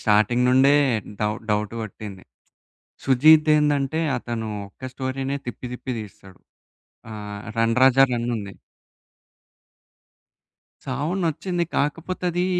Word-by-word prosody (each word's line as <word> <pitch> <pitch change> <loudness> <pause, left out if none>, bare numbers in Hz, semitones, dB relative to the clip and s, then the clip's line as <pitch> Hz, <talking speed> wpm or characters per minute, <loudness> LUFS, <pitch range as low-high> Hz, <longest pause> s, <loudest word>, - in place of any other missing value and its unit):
Starting 110 +3 +3
నుండే 130 +2 +5 0.5
doubt 105 +1 -2
doubt 105 +1 0
గొట్టింది. 100 -2 -8 0.8
Sujeeth 155 +4 +6
ఏందంటే, 150 0 +1 0.2
అతను 115 -2 -4 0.2
ఒక్క 100 - -30
స్టోరీనే 135 +1 -3
తిప్పి 125 +1 -6
తిప్పి 125 +1 -5
తీస్తాడు. 95 -3 -13 0.7
ఆహ్, 105 -1 -7 0.2
'రన్ 115 0 +2
రాజా 135 +1 +6
రన్' 120 0 -2
ఉంది. 100 -2 -7 2.3
సాహో 140 +5 -2
నచ్చింది. 170 +2 -1
కాకపోతే 165 +5 -2
ఆది 175 +1 0
130 Hz, 105 wpm, -23 LUFS, 110-145 Hz, 2.3 s, Sujeeth